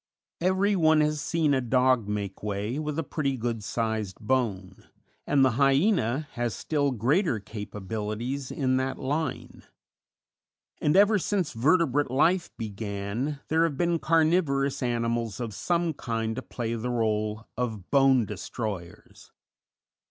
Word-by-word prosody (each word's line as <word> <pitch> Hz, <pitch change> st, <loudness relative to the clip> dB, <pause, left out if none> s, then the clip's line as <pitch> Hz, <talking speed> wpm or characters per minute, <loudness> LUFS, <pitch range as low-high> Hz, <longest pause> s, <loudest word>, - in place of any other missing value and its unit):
Every 190 Hz, +3 st, +2 dB
one 160 Hz, -3 st, +4 dB
has 150 Hz, 0 st, 0 dB
seen 155 Hz, -2 st, +1 dB
a 135 Hz, -, +2 dB
dog 125 Hz, -2 st, +2 dB
make 105 Hz, -1 st, -4 dB
way 105 Hz, +5 st, -2 dB
with 150 Hz, -1 st, -3 dB
a 165 Hz, -, 0 dB
pretty 140 Hz, -3 st, -2 dB
good 115 Hz, -2 st, -3 dB
sized 110 Hz, -3 st, -2 dB
bone, 105 Hz, -6 st, -2 dB, 0.4 s
and 140 Hz, -2 st, +4 dB
the 130 Hz, -, +3 dB
Hyena 140 Hz, -, +2 dB
has 120 Hz, -4 st, -2 dB
still 145 Hz, +3 st, 0 dB
greater 130 Hz, -, +1 dB
capabilities 110 Hz, +5 st, -5 dB
in 130 Hz, -2 st, 0 dB
that 130 Hz, 0 st, -1 dB
line; 145 Hz, +1 st, -3 dB, 1.2 s
and 150 Hz, +5 st, +3 dB
ever 205 Hz, +1 st, +5 dB
since 190 Hz, -3 st, -1 dB
vertebrate 145 Hz, +2 st, +2 dB
life 170 Hz, +8 st, +2 dB
began 110 Hz, +5 st, -4 dB
there 160 Hz, +1 st, +3 dB
have 155 Hz, -5 st, 0 dB
been 170 Hz, 0 st, +1 dB
carnivorous 155 Hz, -4 st, +2 dB
animals 115 Hz, -3 st, -1 dB
of 115 Hz, -3 st, -4 dB
some 170 Hz, -, 0 dB
kind 115 Hz, -4 st, -3 dB
to 130 Hz, -, -4 dB
play 115 Hz, -3 st, -4 dB
the 115 Hz, +2 st, -3 dB
rôle 110 Hz, -2 st, -1 dB
of 110 Hz, -6 st, -4 dB
bone 135 Hz, -4 st, +5 dB
destroyers. 100 Hz, -5 st, -7 dB
130 Hz, 135 wpm, -27 LUFS, 110-150 Hz, 1.2 s, ever